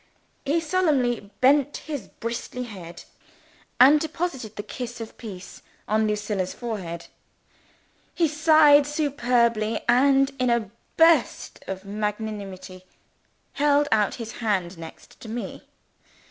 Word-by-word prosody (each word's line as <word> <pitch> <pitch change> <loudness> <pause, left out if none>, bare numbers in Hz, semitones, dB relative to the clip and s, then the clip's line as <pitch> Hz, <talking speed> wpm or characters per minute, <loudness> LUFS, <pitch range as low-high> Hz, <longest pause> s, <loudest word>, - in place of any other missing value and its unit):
He 295 +4 +2
solemnly 290 - 0
bent 280 +2 +4
his 290 -10 -5
bristly 235 +2 -5
head, 185 -8 -10 0.8
and 275 +5 +8
deposited 310 - -4
the 205 - -5
kiss 240 +1 -7
of 225 -1 -8
peace 190 -6 -10 0.3
on 215 +1 +2
Lucilla's 210 -3 -2
forehead. 185 -8 -5 1.1
He 340 -2 +3
sighed 300 -1 +5
superbly, 245 -7 +1
and 270 +2 +4
in 255 -1 +2
a 235 -4 0 0.3
burst 325 -5 +3
of 190 0 -6
magnanimity, 205 -3 -5 0.7
held 290 0 +2
out 210 -2 +2
his 230 -2 -7
hand 190 -5 -1
next 165 -1 -12
to 225 - -10
me. 235 +1 -6
235 Hz, 115 wpm, -24 LUFS, 210-285 Hz, 1.1 s, and